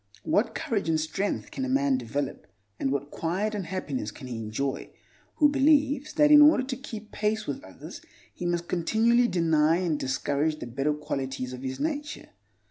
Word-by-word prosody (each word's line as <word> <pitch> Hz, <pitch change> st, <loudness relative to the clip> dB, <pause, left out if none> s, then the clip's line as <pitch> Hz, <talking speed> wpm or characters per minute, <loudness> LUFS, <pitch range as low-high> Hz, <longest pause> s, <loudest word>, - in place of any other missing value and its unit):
What 225 Hz, +2 st, +1 dB
courage 200 Hz, -8 st, -1 dB
and 160 Hz, -1 st, +2 dB
strength 190 Hz, +6 st, -2 dB
can 270 Hz, -, -4 dB
a 265 Hz, -, -2 dB
man 275 Hz, 0 st, +2 dB
develop, 140 Hz, -, -4 dB, 0.3 s
and 135 Hz, -, 0 dB
what 140 Hz, +1 st, -3 dB
quiet 190 Hz, +6 st, -2 dB
and 200 Hz, -5 st, -4 dB
happiness 145 Hz, -, -3 dB
can 115 Hz, -, -11 dB
he 125 Hz, -2 st, -5 dB
enjoy, 130 Hz, +6 st, -3 dB, 0.5 s
who 300 Hz, -, +5 dB
believes 290 Hz, 0 st, +2 dB
that 295 Hz, 0 st, +4 dB
in 295 Hz, 0 st, +10 dB
order 295 Hz, -3 st, +6 dB
to 255 Hz, 0 st, -4 dB
keep 220 Hz, -5 st, -9 dB
pace 215 Hz, +1 st, -1 dB
with 140 Hz, -, -4 dB
others 95 Hz, -, -11 dB, 0.3 s
he 175 Hz, -, -4 dB
must 175 Hz, 0 st, -1 dB
continually 225 Hz, +7 st, +3 dB
deny 160 Hz, -4 st, +3 dB
and 170 Hz, -5 st, -1 dB
discourage 140 Hz, +4 st, -1 dB
the -, -, -7 dB
better 135 Hz, +5 st, -1 dB
qualities 135 Hz, -3 st, -4 dB
of 125 Hz, -, -7 dB
his 130 Hz, 0 st, -4 dB
nature? 295 Hz, -1 st, -3 dB
175 Hz, 180 wpm, -27 LUFS, -, 0.5 s, in